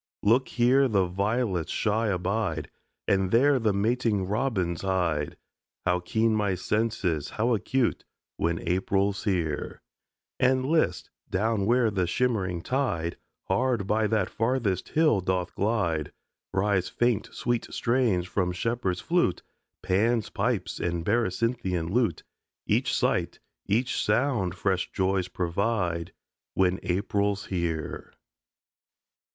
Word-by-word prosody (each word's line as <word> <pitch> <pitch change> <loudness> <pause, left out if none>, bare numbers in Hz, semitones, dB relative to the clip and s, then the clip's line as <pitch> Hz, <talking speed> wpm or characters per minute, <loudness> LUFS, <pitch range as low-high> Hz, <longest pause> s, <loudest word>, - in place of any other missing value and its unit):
Look, 120 +5 +4
here 130 +3 +3
the 100 -6 +2
violets 100 0 -1
shy 110 +1 +1
abide 95 -4 -1 0.4
And 95 -1 +2
there 135 +6 +4
the 110 -3 +2
mating 105 0 +1
robins 100 -5 -1
hide 85 -6 -1 0.5
How 90 0 +2
keen 110 +5 +1
my 100 -3 +1
senses, 95 -6 -1
how 120 +3 0
acute, 125 +3 0 0.3
When 85 0 -2
April's 95 +3 0
here! 85 -7 -2 0.6
And 130 0 +3
list! 160 +3 +1 0.2
down 105 +1 0
where 120 -1 +3
the 95 -3 0
shimmering 95 -6 0
tide 105 -12 -1 0.3
Hard 125 -5 0
by 105 +2 +1
that 105 -3 0
farthest 115 -5 0
hill 155 -11 +3
doth 90 0 -1
glide, 85 -8 0 0.4
Rise 95 -1 +1
faint 120 -3 0
sweet 120 -1 -1
strains 115 -7 +1
from 90 -1 -1
shepherd's 95 -2 -1
flute, 170 - +1 0.4
Pan's 110 +4 +1
pipes - - -1
and 85 -1 -2
Berecynthian 105 -5 0
lute. 110 -6 +1 0.4
Each - - +1
sight, - - 0 0.3
each 120 +5 +1
sound 120 -9 +1
fresh 95 -1 -1
joys 95 -1 0
provide 90 -1 -1 0.4
When 95 0 +2
April's 100 +2 0
here. 85 -4 -3
100 Hz, 115 wpm, -27 LUFS, 90-115 Hz, 0.6 s, Look